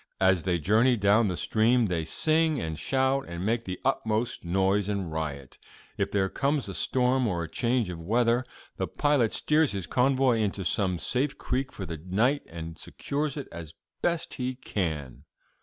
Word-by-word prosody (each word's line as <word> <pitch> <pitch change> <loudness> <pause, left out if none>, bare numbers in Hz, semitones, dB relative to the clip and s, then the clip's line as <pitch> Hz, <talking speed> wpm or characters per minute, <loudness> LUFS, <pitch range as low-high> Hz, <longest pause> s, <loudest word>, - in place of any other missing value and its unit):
As 95 -2 +4
they 90 0 0
journey 110 - +3
down 105 +2 +4
the 90 -3 -2
stream 115 +2 +2
they 85 -5 -1
sing 155 - +2
and 80 -4 -4
shout 135 0 +1
and 85 +2 -5
make 115 +2 0
the 95 -1 -5
utmost 115 -3 0
noise 95 +3 +1
and 100 -5 -2
riot. 75 -4 -5 0.4
If - - -1
there 95 -1 +2
comes 140 +5 0
a 95 - -5
storm 125 +3 +1
or 85 -4 -1
a - - -5
change 120 +5 0
of 85 - -7
weather, 115 +7 +2 0.3
the - - -1
pilot 145 -7 +2
steers 155 -3 +2
his 95 -3 -3
convoy 130 +3 +2
into 100 -3 -1
some 90 -1 +1
safe 130 - -1
creek 130 +1 -2
for 95 - -6
the 80 -3 -6
night, 115 +11 +1
and 80 0 -8
secures 145 0 -3
it 140 - -5
as 80 -2 -9 0.3
best 170 -1 -1
he 130 0 -3
can. 75 - -4
110 Hz, 175 wpm, -27 LUFS, 90-130 Hz, 0.4 s, As